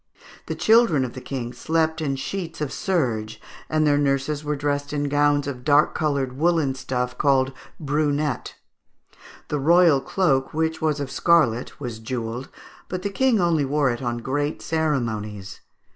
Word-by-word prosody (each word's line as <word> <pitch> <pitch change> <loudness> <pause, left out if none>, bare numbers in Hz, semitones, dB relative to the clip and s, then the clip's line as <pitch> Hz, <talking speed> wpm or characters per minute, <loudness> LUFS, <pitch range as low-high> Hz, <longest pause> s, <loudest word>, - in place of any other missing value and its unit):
] - - -20
The - - -3
children 220 - +4
of 120 - -7
the 130 - -8
King 125 -3 -5
slept 160 +4 0
in 140 -3 -1
sheets 165 +4 -5
of 150 -3 -3
serge, 120 - -1 0.3
and 155 0 +2
their 145 -1 +3
nurses 140 +1 0
were 150 0 -1
dressed 145 0 -2
in 145 -1 -1
gowns 145 0 +2
of 130 -3 -5
dark 145 +2 +4
coloured 140 -5 -1
woollen 160 -4 +2
stuff, 125 -1 -3
called 135 -2 +2 0.3
brunette. 145 -2 -1 0.9
The 150 - -1
royal 165 -1 +5
cloak, 135 -6 0
which 160 0 -1
was 155 -2 0
of 140 -2 -4
scarlet, 135 -6 +2
was 120 -5 -5
jewelled, 120 +2 -4 0.4
but 185 0 -4
the 200 - -2
King 250 +1 +2
only 170 -4 +2
wore 140 -1 +1
it 120 - -5
on 120 -2 -2
great 145 +5 -2
ceremonies. 110 -11 -2
145 Hz, 160 wpm, -23 LUFS, 130-160 Hz, 0.9 s, royal